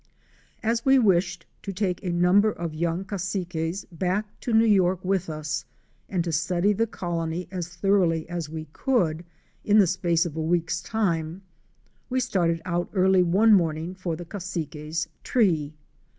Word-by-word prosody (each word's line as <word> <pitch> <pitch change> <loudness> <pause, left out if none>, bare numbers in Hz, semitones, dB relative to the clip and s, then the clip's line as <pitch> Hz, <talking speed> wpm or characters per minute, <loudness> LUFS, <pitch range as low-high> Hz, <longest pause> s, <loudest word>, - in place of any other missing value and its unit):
As 230 +1 0
we 270 0 +5
wished 180 -6 +2 0.2
to 195 - -5
take 190 -2 -2
a 180 - -1
number 180 +5 +4
of 170 -4 -5
young 170 +3 -1
Cassiques 185 -2 -3
back 190 +5 -2
to 245 - -4
New 225 0 +5
York 185 -4 +3
with 190 -2 0
us 155 0 -3 0.5
and 180 -3 0
to 170 - -3
study 175 +5 +1
the 225 +3 0
colony 170 -3 -3
as 180 -3 -3
thoroughly 180 -4 +2
as 170 -3 -4
we 160 0 -6
could 175 -11 0 0.4
in 210 0 +4
the 205 - +7
space 170 -1 +1
of 160 -3 -5
a 160 - -2
week's 170 +1 0
time, 175 -4 -1 0.7
we 260 0 +1
started 175 -9 0
out 175 -1 -1
early 190 -1 +4
one 195 +6 +4
morning 165 -2 +1
for 185 -3 -3
the 175 +2 -8
Cassiques' 160 -4 -4 0.2
tree. 160 - +1
180 Hz, 160 wpm, -25 LUFS, 165-195 Hz, 0.7 s, the